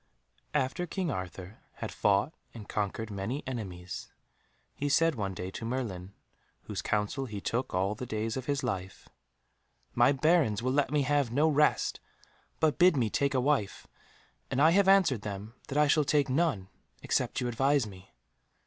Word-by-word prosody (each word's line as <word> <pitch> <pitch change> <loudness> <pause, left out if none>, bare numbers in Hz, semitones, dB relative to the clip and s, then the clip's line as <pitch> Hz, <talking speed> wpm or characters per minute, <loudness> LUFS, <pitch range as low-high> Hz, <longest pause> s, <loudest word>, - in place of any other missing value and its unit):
After 150 +6 0
King 180 -2 -2
Arthur 95 -1 -6
had - - -6
fought 105 +9 +2 0.2
and 105 -3 -9
conquered 105 +1 -3
many 105 +8 -3
enemies, 95 -8 -6 0.6
he 145 - -2
said 165 +3 +4
one 100 -6 -3
day 90 +1 -5
to 115 - -7
Merlin, 105 -6 -4 0.5
whose - - -4
counsel 110 +6 -1
he 105 -3 -5
took 115 +1 -2
all 95 +3 +1
the 125 +4 -7
days 110 0 -2
of 130 -1 -5
his 145 -1 -1
life, 95 -6 -4 0.9
"My 120 +3 +5
Barons 145 -7 +2
will 130 +1 +1
let 145 -1 +2
me 145 0 +1
have 140 -2 +1
no 145 +6 +3
rest, 150 -1 +2 0.6
but 155 +1 +2
bid 180 -3 +6
me 115 -5 +1
take 140 0 +1
a - - +3
wife, 125 -6 0 0.6
and 135 - -1
I 160 +3 +6
have 195 +2 +4
answered 190 - +5
them 105 +1 -6
that 140 - -3
I 150 - +5
shall 150 +1 +3
take 145 -1 +2
none, 130 - 0 0.3
except - - 0
you 125 - -1
advise 135 +2 +2
me." 95 -2 -12
125 Hz, 170 wpm, -30 LUFS, 105-145 Hz, 0.9 s, bid